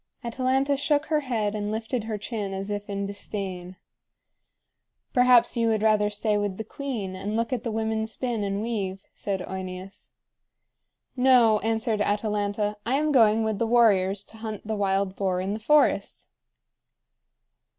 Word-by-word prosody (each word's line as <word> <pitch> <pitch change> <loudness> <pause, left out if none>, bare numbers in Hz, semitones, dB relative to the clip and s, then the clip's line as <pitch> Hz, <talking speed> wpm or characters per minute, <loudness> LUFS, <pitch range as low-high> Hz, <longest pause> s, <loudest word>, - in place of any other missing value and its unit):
Atalanta 265 +3 +1
shook 290 +1 +1
her 310 -1 +1
head 225 -7 -1
and 210 -1 -3
lifted 225 +1 -3
her 220 -1 -3
chin 210 -2 -4
as 195 +2 -4
if 205 0 -4
in 200 0 -2
disdain. 190 -2 -5 1.4
"Perhaps 250 -1 +5
you 230 -1 +1
would 220 -1 +1
rather 210 -1 +3
stay 210 0 0
with 205 -2 -2
the 220 - -4
queen, 225 -9 -5
and 200 +3 -4
look 230 +2 -1
at 240 -2 -2
the 235 - -2
women 220 0 -1
spin 230 -1 -3
and 200 +1 -2
weave," 195 -5 -3
said 195 -2 -3
OEneus. 190 +1 -7 1.1
"No," 250 -4 +5
answered 225 0 0
Atalanta, 210 0 -1
"I 250 +4 0
am 305 +2 +1
going 225 -4 +5
with 220 -2 -1
the 230 - +1
warriors 205 -5 +3
to 220 - -14
hunt 220 -2 -6
the 220 0 -2
wild 195 -1 0
boar 190 -2 0
in 190 +2 -2
the 215 - -4
forest!" 300 +6 +2
215 Hz, 160 wpm, -26 LUFS, 200-235 Hz, 1.4 s, Perhaps